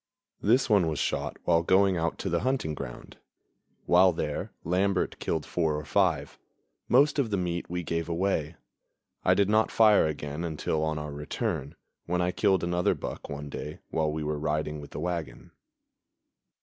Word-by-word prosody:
This 120 +6 +3
one 100 -7 +4
was 80 -2 -2
shot - - -2
while 85 -1 +3
going 95 +2 +4
out 85 -1 -1
to 95 - -3
the 85 - +2
hunting 130 -10 -1
ground. 70 -5 -8 0.7
While 90 +1 +5
there, 75 -2 -3
Lambert 95 +3 0
killed 80 -2 -2
four 80 -3 0
or 75 - -6
five; 70 - +1 0.5
most 145 +4 +4
of 130 -5 +1
the 100 - 0
meat 85 -1 -2
we 90 0 -3
gave 85 0 -2
away. 85 -3 -1 0.7
I - - +4
did 100 - +3
not 110 +1 +3
fire 105 -6 +5
again 75 +1 -4
until 80 -1 -1
on 80 -1 -1
our 75 -1 -5
return, 75 - -3 0.3
when 90 +1 0
I 90 0 +1
killed 95 -2 +2
another 90 0 +1
buck - - -7
one 75 +1 -5
day 75 +1 -6
while 80 -1 +1
we 75 0 -3
were 75 0 -2
riding 75 0 -2
with 70 - -10
the - - -7
wagon. 85 -6 -4
85 Hz, 175 wpm, -28 LUFS, 75-95 Hz, 0.7 s, While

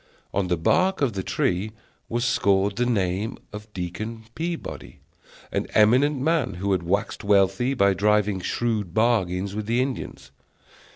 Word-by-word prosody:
On 100 -2 0
the 90 -1 +1
bark 185 - +2
of 130 -6 +2
the 95 - -2
tree 95 +3 -1 0.4
was 120 +1 -1
scored 100 -3 +2
the 125 0 +1
name 100 -1 -1 0.2
of 105 +1 -9
Deacon 105 +5 -5
Peabody, 170 0 -5 0.5
an - - -1
eminent 130 +7 +4
man 140 - +1
who 100 +3 -2
had 95 -2 +2
waxed 95 +4 -2
wealthy 100 +6 +2
by 100 -4 +4
driving 105 0 +2
shrewd 105 -2 -2
bargains 100 -4 +1
with 105 0 -4
the 120 +2 +1
Indians. 130 0 -4
105 Hz, 150 wpm, -24 LUFS, 95-120 Hz, 0.5 s, eminent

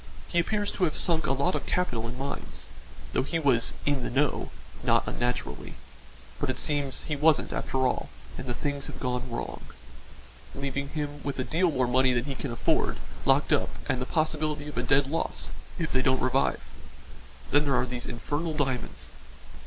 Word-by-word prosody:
He 175 - +1
appears 205 +4 +1
to 185 - +1
have 155 - 0
sunk 165 -2 +4
a - - +3
lot 140 +7 +2
of - - -2
capital 125 -11 0
in 120 +2 -6
mines 140 +1 -5 0.5
thought 130 - +1
he 165 - 0
was 135 -7 +3
'in 145 -2 +2
the - - -2
know,' 140 +4 +1 0.3
not - - +3
unnaturally; 125 0 -2 0.6
but - - -1
it 130 - -1
seems 145 -3 0
he 150 - -2
wasn't 150 +1 +3
after 130 -1 0
all, 125 - 0 0.3
and 130 - -6
the 120 - -1
things 140 +1 -2
have - - -8
gone 125 0 -1
wrong, 120 - -4 0.9
leaving 140 0 -2
him 145 -1 -4
with 140 0 -3
a 130 - 0
deal 170 +8 +2
more 130 -5 +2
money 130 +1 +4
than 120 -1 +1
he 140 - -2
can 135 +1 -4
afford 120 - +1 0.3
locked - - +4
up - - +2 0.2
and 130 -1 0
the 125 - -2
possibility 155 -2 0
of 150 - -7
a - - +2
dead 135 +3 +4
loss 160 +5 -1 0.3
if 165 -2 -2
they 130 - +3
don't 130 0 +3
revive. 130 +1 +1 0.8
Then 145 +1 +5
there 140 -2 +3
are - - +3
these 125 -1 -5
infernal 145 +7 -2
diamonds. 130 - -1
140 Hz, 190 wpm, -28 LUFS, 130-150 Hz, 0.9 s, Then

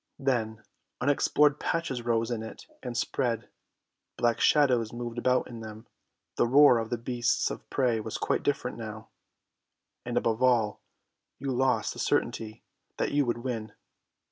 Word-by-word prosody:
Then 115 -5 -1 0.4
unexplored 145 +2 +3
patches 165 -7 -1
arose 115 0 0
in 115 -2 -2
it 110 - -9 0.2
and 125 -2 -5
spread, 120 -2 -1 0.7
black 120 -1 +1
shadows 125 -7 +3
moved 120 0 -5
about 125 +1 +2
in 120 -2 -8
them, 110 0 -9 0.5
the - - +3
roar 135 -1 +7
of 115 -1 -4
the 120 - -1
beasts 120 +1 0
of - - -8
prey 125 -4 +1
was 110 0 -4
quite - - 0
different 125 -5 -1
now, 110 -1 -8 0.9
and - - -3
above 115 0 0
all, 120 -5 +2 0.6
you 140 - -3
lost 130 +1 +1
the - - -10
certainty 110 -1 -1 0.3
that - - -1
you 145 -2 +2
would 120 0 -2
win. 110 -5 -4
120 Hz, 150 wpm, -28 LUFS, 115-130 Hz, 0.9 s, roar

